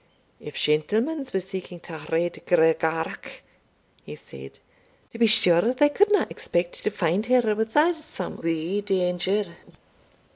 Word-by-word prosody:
"If 150 - -10
shentlemans 230 - 0
were 190 - 0
seeking 185 -1 -7
ta 160 -3 -10
Red 170 +2 -1
Gregarach," 160 -1 0 0.6
he - - -9
said, 70 0 -12 0.5
"to 230 - -10
be 230 - +5
sure 210 +2 +4
they 290 +2 +4
couldna 415 +6 +3
expect 175 0 -3
to - - +1
find 190 +2 -1
her 245 -4 +3
without 295 +11 +2
some 305 - -6
wee 165 +4 -2
danger." 185 -1 -1
185 Hz, 125 wpm, -24 LUFS, 165-230 Hz, 0.6 s, be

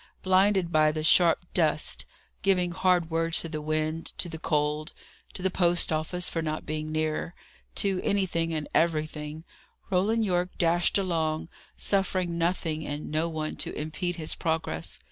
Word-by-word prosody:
Blinded 190 -1 +3
by 155 -1 +4
the 155 0 -3
sharp 170 +2 +5
dust, 155 -3 +1 0.3
giving 180 -3 +2
hard 175 -2 +2
words 165 0 +1
to - - -5
the 155 -1 -4
wind, 155 +1 -2
to - - -1
the 160 -1 -7
cold, 150 0 0 0.4
to 180 - -6
the 190 - +1
post 175 -2 +2
office 175 +3 -1
for 165 - -2
not 155 -1 -3
being 155 0 -3
nearer, 155 +2 -1 0.4
to 195 -2 +1
anything 175 -4 0
and 155 -2 -2
everything, 155 -1 0 0.5
Roland 215 +5 +2
Yorke 180 -1 -1
dashed 175 +2 +3
along, 165 -5 -1 0.3
suffering 185 -3 +1
nothing 165 -2 -1
and 145 0 -5
no 160 +2 0
one 155 -1 -3
to - - -3
impede 160 +4 -3
his 160 -2 0
progress. 160 - -2
165 Hz, 155 wpm, -28 LUFS, 155-180 Hz, 0.5 s, sharp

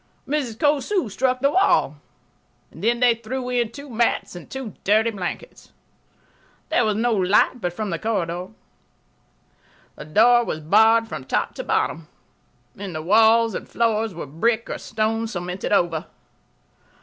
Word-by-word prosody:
Mrs. 270 -6 -2
Cosu 295 - +1
struck 255 +3 0
the 280 +1 +3
wall. 380 +4 +2 0.7
Then 235 +2 -1
they 245 -1 +5
threw 250 +3 -5
in 240 -3 0
two 285 0 -10
mats 235 -6 -1
and 175 - -10
two 265 -6 -6
dirty 220 +3 +3
blankets. 185 -5 -7 1.0
There 245 - +2
was 215 -1 +1
no 235 +2 +1
light 205 +5 +2
but 175 - -1
from 205 +2 -4
the 165 - -3
corridor. 180 -5 -2 1.5
The - - -10
door 235 +9 +4
was 155 - -4
barred 220 +8 +4
from 130 - -7
top - - -1
to - - -6
bottom. 160 -1 -1 0.7
The 190 -5 -6
walls 225 +6 +4
and - - -6
floors 225 -3 0
were 170 - -6
brick 220 - -1
or - - -4
stone 225 +1 -2
cemented 180 -3 -5
over. 170 -4 +1
220 Hz, 145 wpm, -22 LUFS, 185-240 Hz, 1.5 s, they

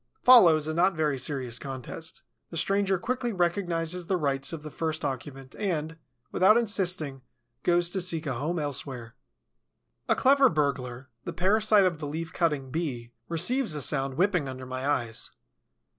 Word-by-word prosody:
Follows 175 -12 +7
a 155 - -2
not 180 +3 +2
very 150 -4 0
serious 130 -3 -2
contest. 135 +4 -7 0.3
The 165 - -6
stranger 195 +3 +1
quickly 245 +5 -2
recognizes 175 -2 -1
the 190 - +1
rights 140 -4 0
of 160 -3 -6
the 155 - -8
first 160 -1 -3
occupant 135 0 -6
and, 165 -6 -2 0.4
without 210 +5 +5
insisting, 180 - 0 0.4
goes 175 0 +2
to 190 - -1
seek 170 -3 -2
a 140 - -2
home 150 +8 -2
elsewhere. 130 -5 -4 1.0
A - - +4
clever 275 +1 +5
burglar, 135 -4 -2 0.2
the - - -4
parasite 210 +2 +3
of 170 -4 0
the 150 - -5
Leaf 165 +3 -5
cutting 150 -6 -1
Bee, 130 -7 -4 0.2
receives 180 - +2
a 150 - -3
sound 135 0 0
whipping 180 -4 +1
under 130 0 -7
my 130 +1 -4
eyes. 120 -5 -1
160 Hz, 160 wpm, -27 LUFS, 135-185 Hz, 1.0 s, Follows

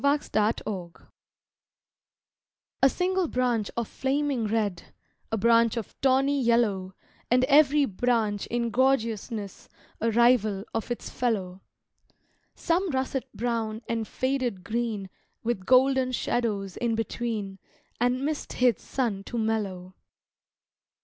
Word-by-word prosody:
Summer's 285 +1 +2
Passing 210 -5 -1 1.9
A 270 - +7
SINGLE 370 +3 0
branch 245 -6 0
of 235 -2 -1
flaming 270 -3 -1
red, 205 -5 -2 0.4
A 225 - 0
branch 230 +1 +4
of 225 - -5
tawny 270 +1 +3
yellow 210 -6 +1 0.3
And 250 +1 +4
every 290 +1 +5
branch 220 -1 0
in 235 -1 -1
gorgeousness 225 -5 -1 0.3
A 230 - +1
rival 220 -4 +3
of 225 +1 -3
its 240 - -4
fellow; 195 -6 -2 0.9
Some 360 +2 0
russet 265 -1 -2
brown 230 -1 -2
and 225 -2 -2
faded 255 -7 -2
green 220 -2 -2 0.4
With 225 -5 -2
golden 260 0 +4
shadows 210 -6 -1
in 235 -2 0
between 220 -3 -3 0.4
And 250 +3 +1
mist 305 0 -3
hid 245 -4 +3
sun 225 -7 -2
to 240 - -5
mellow. 200 -5 -2
235 Hz, 115 wpm, -27 LUFS, 210-260 Hz, 1.9 s, A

